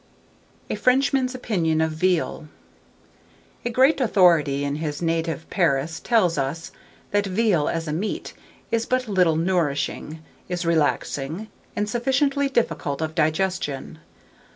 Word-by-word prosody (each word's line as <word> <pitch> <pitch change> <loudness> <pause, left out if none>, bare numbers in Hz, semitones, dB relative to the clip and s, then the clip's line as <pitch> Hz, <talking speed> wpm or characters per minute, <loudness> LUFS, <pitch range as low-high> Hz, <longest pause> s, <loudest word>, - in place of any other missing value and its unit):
A - - -3
FRENCHMAN'S 260 0 +2
OPINION 170 -11 0
OF 160 0 +1
VEAL. 165 -1 0 1.2
A 240 - -1
great 265 +5 +3
authority 170 - +4
in 140 +1 -2
his 150 -2 -3
native 165 -2 -1
Paris 160 -2 +1
tells 185 - +2
us, 140 +5 -3 0.4
that 205 0 +1
veal, 190 -5 +2
as 165 -1 -3
a 150 - -2
meat, 200 +7 -3 0.4
is 230 0 0
but 255 -1 0
little 180 -6 +3
nourishing, 160 -2 -1 0.3
is 175 -1 -2
relaxing, 160 +3 0 0.3
and 210 - -1
sufficiently 275 +4 +1
difficult 225 - -1
of 160 -1 -2
digestion. 160 -2 -1
170 Hz, 125 wpm, -23 LUFS, 155-225 Hz, 1.2 s, authority